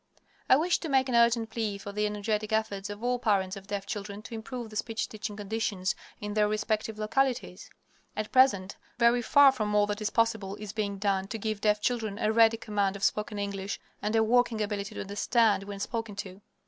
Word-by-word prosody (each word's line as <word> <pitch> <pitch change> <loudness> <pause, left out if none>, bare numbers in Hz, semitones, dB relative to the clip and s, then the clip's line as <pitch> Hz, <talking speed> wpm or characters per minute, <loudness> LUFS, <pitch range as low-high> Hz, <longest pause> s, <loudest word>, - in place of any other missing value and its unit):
I - - +8
wish 335 +5 +2
to 325 - -5
make 265 -1 +3
an 245 - 0
urgent 235 -1 +3
plea 220 -3 -2
for 200 0 -7
the 210 +1 0
energetic 210 +1 -2
efforts 210 -2 -1
of 205 +2 -7
all 245 0 +1
parents 195 -4 +1
of 195 0 -11
deaf 200 -1 -3
children 205 0 -6
to 235 - -9
improve 225 +1 -6
the - - -10
speech 225 +1 -2
teaching 215 -1 -6
conditions 205 -2 -1 0.3
in 210 0 -4
their 210 0 +3
respective 215 +1 -1
localities. 230 -2 -1 0.5
At 215 0 -3
present, 255 -8 +3 0.2
very 240 0 +4
far 280 +3 +6
from 215 -5 -2
all 205 0 +5
that 205 +1 -4
is 215 - 0
possible 220 -4 0
is 210 -1 -8
being 205 -2 -2
done 195 -1 0
to 225 - -4
give 215 -1 -3
deaf 210 -1 +2
children 220 -4 -1
a 215 -1 +1
ready 225 0 +5
command 205 -3 -1
of 200 - -7
spoken 210 +1 0
English, 200 -1 -3 0.2
and 210 +2 -1
a 220 - +4
working 240 0 +2
ability 205 0 -3
to - - -4
understand 205 +1 +2
when 200 -1 -7
spoken 225 0 -4
to. 195 -1 -7
215 Hz, 210 wpm, -29 LUFS, 200-225 Hz, 0.5 s, I